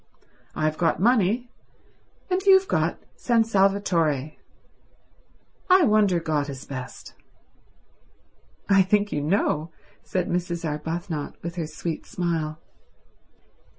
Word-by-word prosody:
I've 155 0 -1
got 165 -2 +1
money, 235 +2 +2 0.8
and 365 +1 +1
you've 380 0 +5
got - - 0 0.2
San 235 -2 +2
Salvatore. 190 -9 +1 1.4
I 370 0 +6
wonder 210 - +3
which 155 -3 -1
is 135 -1 -7
best." 130 -2 -8 1.5
"I 195 -1 +5
think 205 +2 +1
you 145 - -1
know," 155 -1 0 0.3
said 185 -2 -2
Mrs. 175 -1 -2
Arbuthnot 160 +1 -4
with 170 +1 -5
her 165 -3 -2
sweet 160 +1 -5
smile. 165 -3 -2
175 Hz, 105 wpm, -24 LUFS, 155-205 Hz, 1.5 s, I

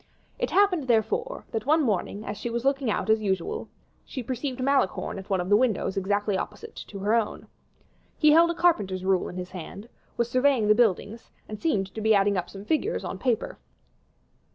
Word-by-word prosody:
It - - -1
happened, 370 -8 +2
therefore, 445 - 0
that 225 +2 -3
one 310 +1 +4
morning, 210 -2 -1
as 205 - -4
she 240 - -5
was 235 +2 -3
looking 275 -3 +1
out 210 - -1
as 220 0 +3
usual, 190 -4 -2 0.3
she 260 - -6
perceived 255 +2 -4
Malicorne 265 -7 0
at 195 - -11
one 190 -2 +1
of 180 - -2
the 205 - +5
windows 220 -4 +1
exactly 205 +1 0
opposite 205 +2 -6
to 200 - -9
her 205 +3 0
own. 230 -2 0 0.7
He 305 -1 +5
held 335 +2 +6
a 340 - -1
carpenter's 200 - +1
rule 190 -1 +1
in - - -9
his 180 0 -6
hand, 190 +4 -8 0.3
was 235 - +1
surveying 255 -2 +2
the 215 - +7
buildings, 225 0 0 0.2
and 215 -1 -8
seemed 195 - 0
to 220 - -5
be 220 0 +4
adding 200 0 +3
up 180 -2 -2
some 195 +1 -10
figures 325 - 0
on - - -5
paper. 260 - -1
220 Hz, 200 wpm, -26 LUFS, 200-270 Hz, 0.7 s, the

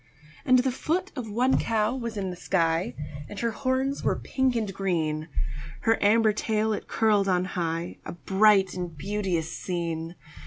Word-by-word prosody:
And 255 - +6
the 255 +1 +2
foot 345 +9 -1
of 245 -5 -5
one 245 +5 +2
cow 225 +1 +1
was 235 -4 -4
in 190 -2 -2
the - - -6
sky, 165 -6 0 0.3
And 205 - -7
her 235 -1 +1
horns 265 +3 -1
were - - +2
pink 265 -2 0
and 215 -4 -1
green; 160 -5 -1 0.5
Her 225 0 +2
amber 215 +1 +5
tail 220 0 0
it - - -5
curled 210 -3 +2
on 180 0 +2
high 170 -2 -3
A - - -6
bright 195 +1 +4
and 175 -3 -5
beauteous 185 -2 -2
scene. 170 -2 -3
205 Hz, 165 wpm, -27 LUFS, 175-230 Hz, 0.5 s, And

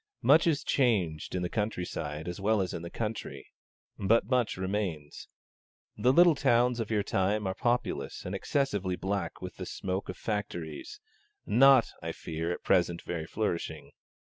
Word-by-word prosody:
Much 155 +4 +6
is 155 -4 +1
changed, 95 - +1
in 90 - -1
the - - 0
country 105 -2 -2
side 75 -1 -5
as 90 +2 -5
well 110 +2 +2
as 95 -2 -1
in - - -4
the 85 - -6
country; 110 +2 -5 0.5
but 110 +4 +3
much 125 -6 +1
remains. 95 -6 -3 0.7
The 125 - +3
little 175 +4 +7
towns 125 -3 +2
of 115 - -2
your 105 -2 +1
time 100 +2 0
are 95 - -1
populous 120 - -1
and 90 - -4
excessively 100 -4 -1
black 95 -2 -3
with 90 - -7
the - - -5
smoke 95 +1 -3
of 90 - -5
factories 85 -8 -4 0.5
not, 130 +3 +6
I - - -4
fear, 80 +1 -4
at - - -5
present 85 -1 +2
very 80 -2 -4
flourishing. 100 -5 -3
100 Hz, 165 wpm, -30 LUFS, 85-115 Hz, 0.7 s, little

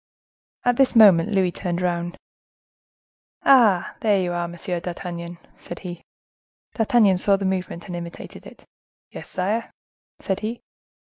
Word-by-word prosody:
At 245 -1 +2
this 270 -2 +3
moment 200 -5 +7
Louis 190 -3 +2
turned 175 -1 -3
round. 175 -1 -2 1.3
"Ah! 225 -10 +5
are 210 -3 +3
you 180 -2 -1
there, 175 0 -2
Monsieur 175 +1 -4
d'Artagnan?" 175 0 -6 0.2
said 175 - -9
he. 175 -1 -7 0.7
D'Artagnan 215 -5 +3
saw 200 +1 +3
the 195 0 -3
movement 185 -2 -3
and 175 - -6
imitated 170 0 -9
it. - - -16 0.5
"Yes, - - -10
sire," 205 +5 -2 0.5
said 190 - -2
he. 225 +2 -5
185 Hz, 135 wpm, -23 LUFS, 175-210 Hz, 1.3 s, moment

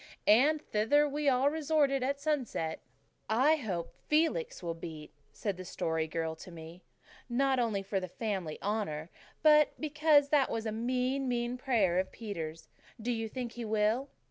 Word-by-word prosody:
And 290 +8 +5
thither 255 +8 +3
we 290 0 +1
all 265 +2 +3
resorted 295 -3 +1
at 275 +2 -1
sunset. 265 - -1 0.5
"I 265 +8 +4
hope 185 - -4
Felix 330 - +1
will 170 -1 -2
beat," 160 -2 -9 0.2
said 200 -4 -3
the 185 - -6
Story 160 -2 -2
Girl 160 0 -2
to - - -11
me, 165 +1 -11 0.5
"not 265 +2 +2
only 220 -5 0
for 195 0 -1
the 185 - -5
family 190 -5 -3
honour, 190 -7 -2 0.3
but 300 -1 +5
because 300 -1 +3
that 285 -3 +3
was 225 0 -3
a 220 - -1
mean, 255 +4 -1
mean 240 0 -1
prayer 230 -9 +2
of 190 - -2
Peter's. 165 -8 -6 0.3
Do 235 +3 -2
you 225 -2 -2
think 245 0 -4
he 240 0 -6
will?" 220 +5 +1
235 Hz, 165 wpm, -31 LUFS, 185-280 Hz, 0.5 s, And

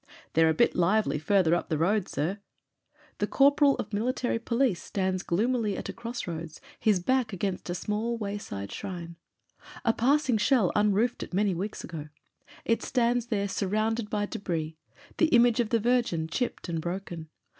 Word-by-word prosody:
"They're 160 0 +5
a - - +3
bit - - +3
lively 185 -1 +2
farther 170 +1 +3
up 175 - 0
the 155 - 0
road, 190 +5 +1
sir." 165 +9 -2 0.8
The - - +1
corporal 280 0 +4
of 210 - -6
military 240 +2 0
police 235 -5 +1
stands 185 -2 -1
gloomily 215 +2 0
at - - -5
a - - -4
cross 235 +1 -5
PROLOGUE 170 -4 -4
xiii - - -6
roads, 160 -1 -11 0.2
his 210 -4 +3
back 250 +3 0
against 190 -1 -3
a 175 - -1
small 215 +5 -2
wayside 200 - -5
shrine. 170 -4 -6 0.7
A 230 - +4
passing 260 -1 +2
shell 210 -3 +3
unroofed 210 +3 +2
it - - -5
many 200 -1 +2
weeks 195 +5 -4
ago; 155 -3 -7 0.6
it 230 - +1
stands 240 -1 +1
there 200 -4 0
surrounded 215 +3 -1
by 205 -1 0
debris 165 -6 -3 0.2
— 285 - -23
the 330 - +5
image 240 -4 +4
of 235 -3 +1
the 230 - +2
Virgin, 230 -9 +1
chipped 240 +7 -3
and 165 -2 -2
broken. 175 -2 -5
205 Hz, 175 wpm, -28 LUFS, 175-235 Hz, 0.8 s, They're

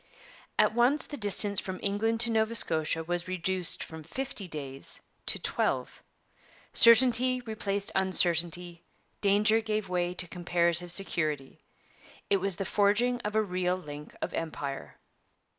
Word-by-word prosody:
At - - +3
once 245 +6 +3
the - - -7
distance 205 -3 +3
from 185 -1 -6
England 225 +3 0
to 240 -1 +2
Nova 220 +1 0
Scotia 160 -4 +1
was 175 +2 -3
reduced 185 0 -2
from 160 -1 -10
fifty 205 - -5
days 140 -4 -6 0.3
to - - +3
twelve. - - -2 0.7
Certainty 250 +2 +5
replaced 205 -3 -4
uncertainty; 175 -2 +2 0.4
danger 210 +2 +3
gave 215 -3 -3
way 180 0 -1
to 180 - -4
comparative 175 0 +1
security. 155 -7 -1 0.7
It 200 - +5
was 195 -1 -2
the 195 - -4
forging 210 +6 +2
of 210 -1 -4
a 220 - +3
real 180 -2 -1
link 150 -4 -10
of - - -4
Empire. 145 -4 -5
190 Hz, 135 wpm, -29 LUFS, 170-220 Hz, 0.7 s, Certainty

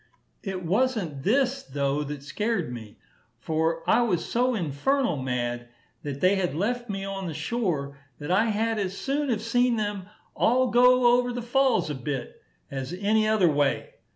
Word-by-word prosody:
It 190 -3 -5
was'ent 195 - 0
this, 265 - +1
though, 140 - -1
that 145 -1 -6
scared 210 - -2
me; 110 -3 -9 0.4
for 160 +4 -1
I - - +4
was 200 -8 0
so 250 +1 +1
infernal 200 - 0
mad 120 -2 -3 0.3
that 140 -1 -6
they 185 +2 +4
had 180 -6 -1
left 240 +7 -2
me 195 -1 -3
on 195 -1 -4
the 160 - -5
shore, 150 -6 -2 0.2
that 145 +4 -5
I 200 +5 +4
had 225 0 0
as 195 -1 -3
soon 280 +1 -1
have 220 -3 -1
seen 245 +1 +2
them 205 -3 -3 0.3
all 255 +1 +2
go 245 0 +5
over 245 0 -1
the 245 -1 -4
falls 255 - +2
a - - -2
bit, 135 0 -5 0.3
as 135 +3 -4
any 215 +3 +1
other 205 -6 +3
way. 145 -1 0
195 Hz, 170 wpm, -26 LUFS, 145-240 Hz, 0.4 s, go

